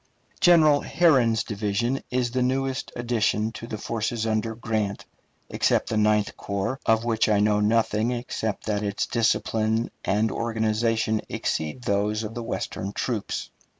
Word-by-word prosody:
General 155 -5 +6
Herron's 125 -10 +3
division 110 +5 -1
is 125 -1 0
the 130 +1 0
newest 130 +1 -1
addition 115 -2 0
to 115 - -8
the 110 - -5
forces 115 +1 -2
under 110 0 -1
Grant, 110 -3 -2 0.4
except - - +1
the 110 - -1
Ninth 105 -1 +2
Corps, 100 +6 -3
of 115 0 +3
which 110 -2 +1
I 105 -1 +3
know 105 0 +3
nothing 110 +1 +2
except 120 -3 -3
that 105 -2 -1
its 100 -1 -1
discipline 110 0 0
and 105 +3 +1
organization 110 -1 0
exceed 80 +11 -3
those 105 +1 0
of 110 +1 -5
the 120 - -5
Western 100 -3 -4
troops. 115 -3 -3
110 Hz, 145 wpm, -25 LUFS, 105-120 Hz, 0.4 s, General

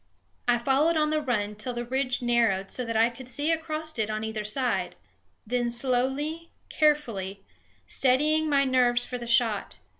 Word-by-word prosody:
I 240 0 +4
followed 280 +7 +2
on 305 0 +2
the 310 0 +1
run 215 -7 -1
till 240 +4 -5
the 240 0 -3
ridge 255 0 -1
narrowed 230 -5 +1
so 250 - -3
that 230 -1 -2
I 230 +2 +4
could 250 +1 -11
see 290 +4 0
across 315 -3 -3
it 220 -1 0
on 215 0 -3
either 220 -1 -3
side, 245 +4 -1 0.5
then 240 +1 0
slowly, 265 +7 -1 0.2
carefully, 230 -11 0 0.4
steadying 305 +4 +2
my 280 -1 +4
nerves 245 -2 +2
for 250 - -5
the 240 - -7
shot. 225 - +1
250 Hz, 170 wpm, -27 LUFS, 230-290 Hz, 0.5 s, I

